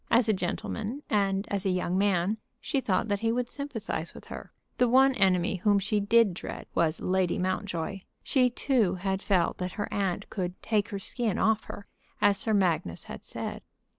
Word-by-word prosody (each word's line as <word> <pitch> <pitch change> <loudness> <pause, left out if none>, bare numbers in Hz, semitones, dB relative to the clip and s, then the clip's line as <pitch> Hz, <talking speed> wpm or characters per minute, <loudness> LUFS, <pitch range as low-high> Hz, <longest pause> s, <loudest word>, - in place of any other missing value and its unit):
As 235 0 +4
a 215 - +4
gentleman, 215 +7 -3
and 195 -1 +1
as 200 -2 0
a 195 - +1
young 180 -1 0
man, 195 +1 +2 0.2
she 275 - -1
thought 205 0 0
that 205 -1 +1
he 225 +1 +1
would 245 +1 0
sympathize 245 - -5
with - - -11
her. - - -9 0.3
The 250 -1 +4
one 265 +2 +6
enemy 190 -4 +2
whom 205 +3 +3
she 205 +2 0
did 210 -1 +4
dread 170 - -7
was 165 -1 +1
Lady 185 -1 +1
Mountjoy. 185 0 -2 0.2
She 255 -2 +3
too 235 -6 +1
had 190 +1 -2
felt 190 -5 +1
that 180 0 -3
her 205 - -3
aunt 195 -3 -1
could 180 -2 -3
"take 215 -3 +1
her 200 - -3
skin 220 +1 -1
off 220 +1 +2
her," 200 - -8 0.3
as 200 -1 +4
Sir 220 - +2
Magnus 165 - 0
had - - -9
said. - - -5
200 Hz, 190 wpm, -28 LUFS, 185-225 Hz, 0.3 s, one